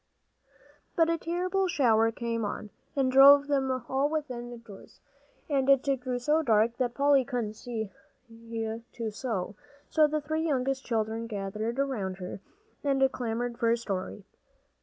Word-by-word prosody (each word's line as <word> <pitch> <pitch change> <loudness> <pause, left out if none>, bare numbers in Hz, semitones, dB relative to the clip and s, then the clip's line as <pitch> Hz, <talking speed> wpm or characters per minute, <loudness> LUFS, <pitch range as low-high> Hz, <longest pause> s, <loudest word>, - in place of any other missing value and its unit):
But 330 0 +3
a 335 - -1
terrible 365 +3 0
shower 225 -8 +3
came 230 0 -3
on, 210 0 -4 0.2
and 265 -2 +2
drove 280 +2 +8
them 275 -2 0 0.2
all 270 +2 +1
within 250 -6 -4
doors, 205 -4 -14 0.5
and 275 -2 +1
it 275 -1 +5 0.2
grew 250 -1 -2
so 300 +6 +2
dark 230 -3 +2
that 245 -2 -1
Polly 280 -1 +4
couldn't 240 -5 -3
see 220 -2 -5 0.4
to 230 0 -6
sew. 205 -4 -3 0.4
So 310 -1 +5
the 305 +1 -1
three 315 +2 -2
youngest 270 -3 0
children 225 0 -2
gathered 215 +3 -4
around 220 -10 -2
her 185 +1 -7 0.4
and 270 -2 +2
clamored 235 0 -3
for 230 -2 +2
a 230 - +3
story. 200 -2 -4
245 Hz, 145 wpm, -28 LUFS, 225-280 Hz, 0.5 s, drove